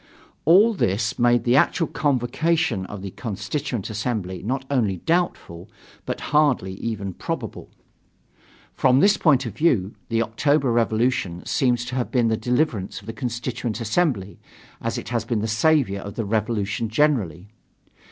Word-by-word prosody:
All 200 +9 +6
this 110 - -1
made 120 -1 +4
the 120 +1 +3
actual 165 +4 +3
convocation 140 - 0
of 100 -2 -8
the 100 - -5
Constituent 115 +2 -4
Assembly 105 -5 -3
not 130 +6 -2
only 110 -9 +1
doubtful, 105 - -2 0.4
but - - -3
hardly 140 -11 +3
even 100 -4 -4
probable. - - -5 1.0
From 130 0 +3
this 200 +4 +5
point 140 -5 +3
of 110 -3 -6
view, 110 - +1 0.2
the 115 0 +2
October 135 +4 +1
revolution 115 -6 0
seems 125 -4 +1
to 125 - -7
have 125 - -1
been 120 -3 +2
the 110 - +2
deliverance 120 -3 -1
of 100 - -17
the 115 - -6
Constituent 120 0 -3
Assembly, 115 - -1 0.4
as - - -2
it - - -6
has 120 -2 -1
been 115 -2 -1
the 110 - -1
savior 110 -2 +2
of 100 +1 -8
the 115 - -2
Revolution 110 0 -1
generally. 105 - 0
115 Hz, 150 wpm, -23 LUFS, 105-135 Hz, 1.0 s, All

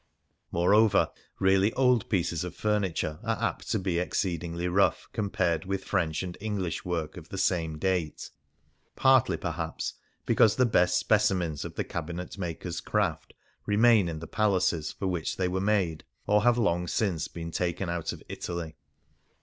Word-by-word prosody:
More 85 +3 +3
over, 110 -1 +4 0.3
really 95 +2 +4
old 125 -4 +2
pieces 85 -5 0
of 90 - -6
furniture 95 -7 -1
are - - -1
apt - - -2
to - - +1
be 90 -2 -1
exceedingly 85 -1 -2
rough 95 +3 +2
compared 95 -5 0
with 95 0 -2
French 90 -4 0
and 90 -2 -5
English 100 -5 -2
work 85 -3 -3
of 80 - -11
the 95 - -6
same 80 -5 0
date; 90 -2 -2 0.6
partly, 130 -1 +4
perhaps, 80 -2 -3 0.3
because 110 -2 +4
the 130 - +4
best 90 -5 +3
specimens 95 -9 +1
of - - -7
the - - -1
cabinet 90 +1 -5
makers 85 -3 -4
craft - - -1 0.3
remain 105 -2 +5
in 80 - -4
the 80 - -7
palaces 90 -7 +1
for - - -6
which 90 -4 -2
they 90 - +1
were 95 +1 -1
made, 95 -6 +1 0.2
or 105 0 +3
have 120 +1 +4
long 90 -6 +1
since 85 -5 0
been 85 -1 -7
taken 90 +2 -1
out 85 -1 -2
of - - -10
Italy. 85 -3 -5
90 Hz, 160 wpm, -28 LUFS, 85-105 Hz, 0.6 s, remain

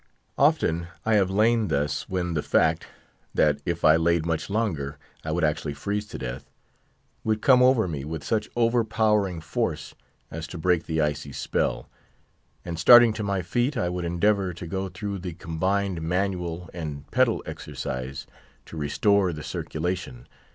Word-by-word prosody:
Often 85 +1 +2 0.2
I 110 - +2
have 100 -3 +3
lain 110 +3 +3
thus 70 -1 -1
when 90 -2 -1
the 75 - 0
fact, 80 +1 +1 0.5
that 75 -1 +3
if 85 -1 -1
I 80 +1 +7
laid 85 0 +2
much 80 +1 -2
longer 80 -10 -2 0.3
I 80 - -5
would 85 +2 0
actually 75 -1 0
freeze 105 +8 -3
to - - -7
death, 60 0 -6 0.7
would 110 -1 -1
come 130 -2 +6
over 125 -5 +4
me 75 -5 -4
with 80 +2 -5
such 110 -2 -1
overpowering 110 -6 +1
force 80 - -3 0.4
as 80 -1 -5
to 85 - -8
break 85 0 +1
the 80 -1 0
icy 75 -1 -2
spell, - - -2 0.8
and 85 -2 -5
starting 120 +2 +8
to 110 - -4
my 100 -2 -1
feet, 120 - 0
I 90 - 0
would 90 0 -3
endeavour 90 +1 +1
to 85 - -7
go 95 +3 -3
through 100 +2 -5
the 90 -1 -5
combined 90 +3 -1
manual 90 0 -2
and 75 -4 -6
pedal - - +2
exercise 65 +1 -5 0.4
to 80 - -10
restore 95 +6 +2
the 75 -2 -7
circulation. 80 -7 -4
90 Hz, 160 wpm, -25 LUFS, 80-100 Hz, 0.8 s, starting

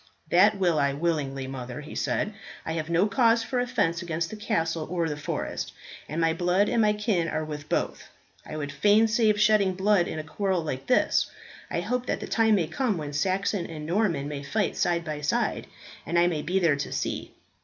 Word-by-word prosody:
"That 200 +4 +5
will 175 -5 +2
I 140 0 +2
willingly, 140 -4 -1
mother," 130 +1 -6
he 150 - -10
said. 210 - -1 0.3
"I - - -3
have 160 0 -3
no 170 +3 +3
cause 230 +2 +3
for 250 +2 -2
offence 225 -9 0
against 170 -1 -2
the - - -5
castle 165 -6 -1
or 170 -1 0
the 150 - -2
forest, 145 - -4 0.4
and 155 - -3
my 165 -1 +3
blood 180 +4 +2
and 235 - +2
my 210 -1 +4
kin 210 -5 0
are 155 -1 -2
with 150 -1 -7
both. - - -2 0.3
I 155 - -7
would 145 -1 -4
fain 205 +9 +4
save 215 -2 +2
shedding 215 -2 +4
of 185 - -4
blood 195 -2 +3
in - - -4
a 155 - -3
quarrel 185 +2 -1
like 135 -4 -4
this. 250 - +3 0.4
I - - -1
hope 250 0 -2
that - - -1
the - - -5
time 225 -1 +3
may 180 -5 +1
come 215 - -1
when 150 -2 -5
Saxon 190 +4 0
and 155 -2 -7
Norman 170 -5 0
may 145 -1 -5
fight 200 +8 -1
side 170 -1 0
by 150 -2 -4
side, 150 - 0 0.4
and 170 - -1
I 170 - +5
maybe 175 +2 0
there 165 -6 +3
to 140 - -4
see." - - -3
170 Hz, 210 wpm, -27 LUFS, 155-210 Hz, 0.4 s, That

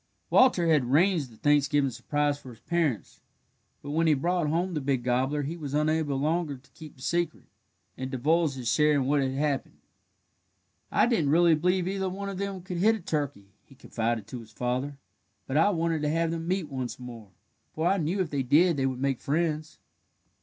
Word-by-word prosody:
Walter 250 -9 +5
had 155 -6 +3
arranged 155 +2 +2
the 110 - -17
Thanksgiving 145 -1 +2
surprise 145 +3 -1
for 130 - -12
his 115 -2 -13
parents, 165 -9 -2 0.6
but 145 - -6
when 165 +2 +2
he 155 - +5
brought 170 +3 0
home 175 +4 0
the 150 - -2
big 135 -2 0
gobbler 130 +4 0
he 155 +5 -4
was 145 -4 -5
unable 150 -2 +1
longer 155 0 -1
to 125 - -24
keep 155 -2 -12
the 130 - -14
secret, 170 0 -1 0.5
and 130 0 -5
divulged 150 +3 +1
his 125 -3 -6
share 150 +6 +3
in 135 -2 +1
what 145 +1 +2
had 130 -1 -1
happened. 140 0 -2 1.1
"I - - +4
didn't 200 - +1
really 170 +2 +5
believe 180 +3 +1
either 190 0 -1
one 200 +2 -5
of 195 -1 -6
them 200 -2 -4
could 180 -1 -5
hit 215 +6 +4
a - - -6
turkey," 145 - -3
he 135 - -19
confided 115 -4 -2
to 125 - -6
his 115 -2 -13
father, 125 +5 -2 0.5
"but 135 - -4
I 165 +7 +5
wanted 165 -4 0
to 150 - 0
have 165 +1 0
them 165 0 -4
meet 185 -2 -1
once 130 -4 -5
more, 120 -4 -10 0.5
for 160 - -1
I 195 +2 +3
knew 180 +3 0
if 175 - -3
they 140 -2 0
did 155 +6 +4
they 135 -1 +1
would 130 -1 -3
make 135 -2 -1
friends." 155 0 -1
150 Hz, 205 wpm, -27 LUFS, 135-170 Hz, 1.1 s, Walter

